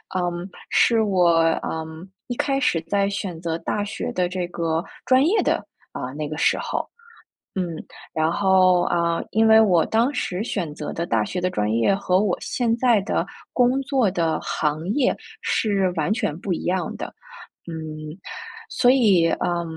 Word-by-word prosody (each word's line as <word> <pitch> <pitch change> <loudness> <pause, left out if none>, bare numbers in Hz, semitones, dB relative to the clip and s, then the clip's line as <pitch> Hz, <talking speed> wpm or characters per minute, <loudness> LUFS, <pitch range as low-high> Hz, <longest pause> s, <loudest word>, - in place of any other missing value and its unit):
嗯， 175 +1 -2 0.2
是 230 -2 +4
我， 180 -5 +3 0.3
嗯， 160 +3 -6 0.2
一 245 - -3
开 275 +1 0
始 225 - +1
在 200 -1 +2
选 190 -4 -4
择 165 -1 -2
大 205 - -2
学 205 - -4
的 180 -1 +1
这 180 -1 -3
个 165 -1 -1 0.2
专 260 +1 +5
业 400 +7 +3
的， - - 0 0.3
啊， 125 - -5
那 150 0 -4
个 155 0 -5
时 - - +3
候。 - - -3 0.7
嗯， 185 -2 0 0.5
然 160 +1 +1
后， 185 -2 +4
啊， 170 -1 +1
因 220 +2 +3
为 220 0 +7
我 180 -7 +4
当 235 +6 +1
时 185 -4 -2
选 175 -10 -3
择 150 0 -6
的 170 - -2
大 110 -8 +1
学 180 - -4
的 185 - +1
专 105 -10 -1
业 115 +12 +3
和 185 -1 +1
我 200 -4 0
现 235 -2 -1
在 240 -4 +3
的 - - -1 0.3
工 255 +2 +2
作 265 -6 +1
的 165 -3 0
行 155 +3 -2
业 270 -2 +2 0.3
是 195 -4 +1
完 160 +7 +1
全 210 -9 -2
不 190 -1 -2
一 - - -5
样 185 0 -1
的， - - -5 0.6
嗯， 155 +1 -7 0.5
所 245 - +4
以， 200 -10 +4
呃， 175 0 0
180 Hz, 185 characters per minute, -23 LUFS, 165-220 Hz, 0.7 s, 为